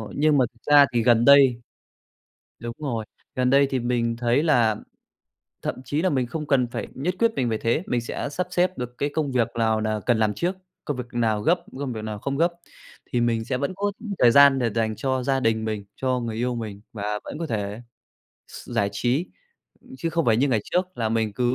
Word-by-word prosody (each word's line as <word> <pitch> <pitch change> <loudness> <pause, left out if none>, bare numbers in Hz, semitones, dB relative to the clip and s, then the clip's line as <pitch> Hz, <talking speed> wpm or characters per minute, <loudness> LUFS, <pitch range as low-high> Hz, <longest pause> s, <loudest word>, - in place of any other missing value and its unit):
nhưng 150 0 +3
mà 130 - +4
thực 115 - -29
ra 145 -1 +9
thì 120 -1 +2
gần 120 0 +4
đây 135 -4 +6 1.0
đúng 120 +1 -5
rồi, 120 -7 -3 0.3
gần 125 0 +1
đây 140 +1 +5
thì 130 - 0
mình 120 -1 0
thấy 120 +3 +1
là 120 -9 +3 0.9
thậm - - -2
chí 150 +4 -1
là 185 - +2
mình 130 -3 0
không 150 +5 -5
cần 135 -4 +2
phải 120 - -5
nhất 170 +7 -2
quyết 230 -1 +3
mình 125 -2 0
về 110 -1 -1
thế, 115 +9 0
mình 120 - 0
sẽ 120 +4 -4
sắp 180 +6 -3
xếp 180 +1 +1
được 125 0 -5
cái 145 - -1
công 150 -4 -1
việc 120 -3 +2
nào 110 -1 +2
là 110 0 -1
cần 120 -2 +3
làm 110 -1 +1
trước, 180 +2 -1 0.3
công 145 - -3
việc 125 - -4
nào 115 -3 +1
gấp, 170 +9 +2 0.2
công 140 -2 -3
việc 110 -2 -6
nào 105 -1 -5
không 140 +6 -3
gấp 170 +3 +2 0.6
thì 120 - +1
mình 115 -1 +1
sẽ 130 - -2
vẫn 140 +6 -2
có 205 +1 -1 0.3
thời 120 - +6
gian 140 +1 +7
để 120 -3 0
dành 110 -1 0
cho 130 +1 -1
gia 135 +1 +1
đình 110 -2 +1
mình, 110 -2 -3
cho 130 -1 0
người 115 -2 -4
yêu 125 +2 -1
mình 110 -4 -6
và 105 -1 -3
vẫn - - -7
có 165 - -3
thể 105 -4 -3 0.7
s - - -11
giải 100 -1 0
trí 125 - -1 0.7
chứ 165 - -2
không 165 0 0
phải 110 -2 +3
như 135 +5 +2
ngày 115 -5 +2
trước 185 0 -1
là 115 -2 0
mình 110 -1 0
cứ 120 +3 0
125 Hz, 230 wpm, -24 LUFS, 115-140 Hz, 1.0 s, ra